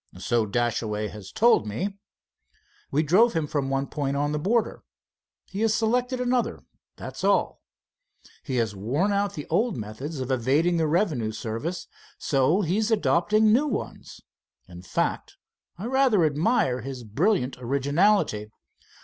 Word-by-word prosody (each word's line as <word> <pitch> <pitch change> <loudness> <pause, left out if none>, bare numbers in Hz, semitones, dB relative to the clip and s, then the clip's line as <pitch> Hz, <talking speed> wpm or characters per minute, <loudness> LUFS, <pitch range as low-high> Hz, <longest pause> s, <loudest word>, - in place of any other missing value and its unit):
"So 110 +4 0
Dashaway 110 -1 -1
has 105 -3 -10
told 230 - +3
me." 185 - -3 1.0
"We 150 +3 +1
drove 200 +10 +4
him 165 -3 0
from 140 -2 -2
one 135 0 0
point 140 -1 -3
on 145 +1 0
the 150 - -1
border. 220 +7 0 0.6
He 195 - -6
has 220 -1 +2
selected 245 +3 0
another, 250 -1 -1 0.3
that's - - -8
all. - - +1 0.8
He 130 - -4
has 115 -4 0
worn 140 - 0
out 200 -1 0
the 150 - -6
old 220 - +1
methods 120 +8 -6
of 130 0 -3
evading 140 +8 +2
the 160 -1 +1
revenue 150 - 0
service, 115 +12 -4 0.3
so 145 +8 +2
he 180 +1 0
is 220 0 0
adopting 210 - +3
new 280 +6 +3
ones. 235 - -5 0.5
In 90 -1 -11
fact, 90 - -2 0.4
I 190 - -6
rather 250 -8 +3
admire 150 - +1
his 130 0 -7
brilliant 135 - 0
originality. 140 - +1
150 Hz, 145 wpm, -25 LUFS, -, 1.0 s, drove